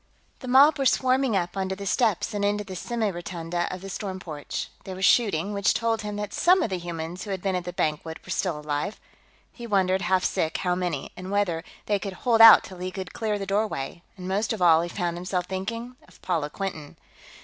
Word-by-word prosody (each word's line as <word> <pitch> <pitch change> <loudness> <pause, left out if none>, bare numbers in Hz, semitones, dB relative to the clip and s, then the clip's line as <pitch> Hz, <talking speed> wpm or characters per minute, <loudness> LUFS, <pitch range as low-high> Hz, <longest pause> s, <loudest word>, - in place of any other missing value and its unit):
_" - - -36
The 255 - -9
mob 275 +3 +6
were 270 - +1
swarming 255 -3 +2
up 175 0 -2
onto 190 -1 -2
the 200 +1 -7
steps 215 +1 +1
and 205 -1 -2
into 205 +1 +1
the 190 -2 -8
semi 225 +1 -1
rotunda 175 0 -3
of 185 - -6
the 195 - -7
storm 190 -2 -5
porch. 155 -5 -5
There 190 - -7
was 190 +1 0
shooting, 205 -4 +3
which 200 0 +2
told 225 -1 0
him 210 -1 -5
that 205 0 -4
some 365 +2 +4
of 215 - -2
the 185 - -1
humans 170 0 -5
who 210 - -8
had 190 -1 -2
been 195 -1 0
at 180 -1 -3
the 180 - -4
banquet 160 -1 -2
were - - -7
still 175 -6 -1
alive. 150 +7 -3 0.5
He 240 -1 -9
wondered, 190 -3 +2
half 185 -1 +2
sick, 160 - 0
how 180 -1 0
many, 175 -6 -3
and 185 +1 -8
whether 195 -5 0 0.2
they 205 -1 +1
could 195 -1 -5
hold 225 +4 +2
out 225 -1 +10
till 185 -1 -10
he 185 +1 -3
could 185 -2 -7
clear 215 -2 -1
the 195 - -4
doorway, 195 -7 -2 0.2
and, 180 -1 -7
most 200 +4 0
of 220 - -5
all, 165 -2 +6
he 170 - -3
found 175 -2 -2
himself 180 0 -2
thinking 230 +7 -5
of - - -20
Paula 165 -5 -1
Quinton. 160 -4 -6
190 Hz, 230 wpm, -26 LUFS, 175-210 Hz, 0.5 s, out